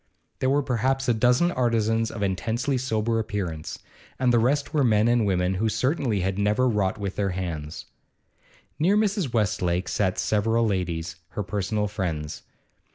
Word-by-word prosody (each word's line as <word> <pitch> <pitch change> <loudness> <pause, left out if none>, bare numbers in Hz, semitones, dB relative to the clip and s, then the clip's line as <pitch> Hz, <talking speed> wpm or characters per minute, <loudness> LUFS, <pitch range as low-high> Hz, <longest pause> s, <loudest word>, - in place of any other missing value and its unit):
There 130 - +1
were 140 +1 +2
perhaps 130 +2 0
a 120 - +4
dozen 125 +9 +3
artisans 115 -4 +1
of 105 - -5
intensely 115 +9 -1
sober 115 -2 0
appearance, 95 -8 -4 0.4
and 125 -1 +2
the 120 - +5
rest 140 +5 +1
were 150 -3 +3
men 110 -2 +3
and 120 -3 +3
women 90 -1 +1
who 110 +4 0
certainly 125 - 0
had 95 +2 -1
never 105 +5 +2
wrought 105 -3 0
with 100 -2 -4
their 100 -1 +1
hands. 80 -4 -5 0.9
Near 185 +7 +3
Mrs. 200 - +1
Westlake 90 -5 0
sat 95 -3 0
several 115 +2 +1
ladies, 85 -4 -2 0.2
her 105 - 0
personal 105 +1 -1
friends. 85 -8 -4
110 Hz, 160 wpm, -25 LUFS, 95-125 Hz, 0.9 s, the